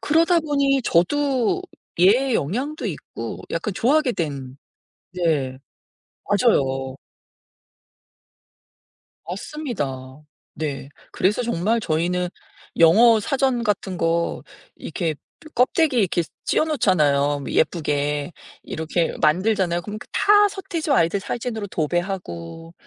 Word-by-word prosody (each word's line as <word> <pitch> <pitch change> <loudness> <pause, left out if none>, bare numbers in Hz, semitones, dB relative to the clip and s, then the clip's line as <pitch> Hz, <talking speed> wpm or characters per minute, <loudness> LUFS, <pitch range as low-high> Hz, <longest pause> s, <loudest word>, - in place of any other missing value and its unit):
그러다 330 +3 +3
보니 280 -3 +1
저도 260 - +1 0.4
얘의 235 +8 +4
영향도 255 - -2
있고 115 - -6
약간 165 +5 -2
좋아하게 270 +3 +2
된. 140 - -4 0.6
네. 150 -7 0 0.7
맞아요. 135 - +1 2.3
맞습니다. 150 - -5 0.3
네. 140 -3 -4 0.2
그래서 210 +6 +1
정말 225 0 0
저희는 180 0 -1 0.5
영어 220 +8 +7
사전 260 0 0
같은 195 -3 -1
거 170 0 0 0.3
이렇게 160 -1 -3 0.4
껍데기에 260 +2 +3
이렇게 180 -4 +1 0.2
씌어 - - +2
놓잖아요 150 - +2
뭐 - - -6
예쁘게. 150 -1 0 0.3
이렇게 160 +1 -2
만들잖아요. 175 +2 +2
그럼 210 +2 -7
다 415 0 +5
서태지와 375 -6 -1
아이들 170 +4 +1
사진으로 225 0 -4
도배하고 165 - -4
185 Hz, 240 characters per minute, -22 LUFS, 155-250 Hz, 2.3 s, 영어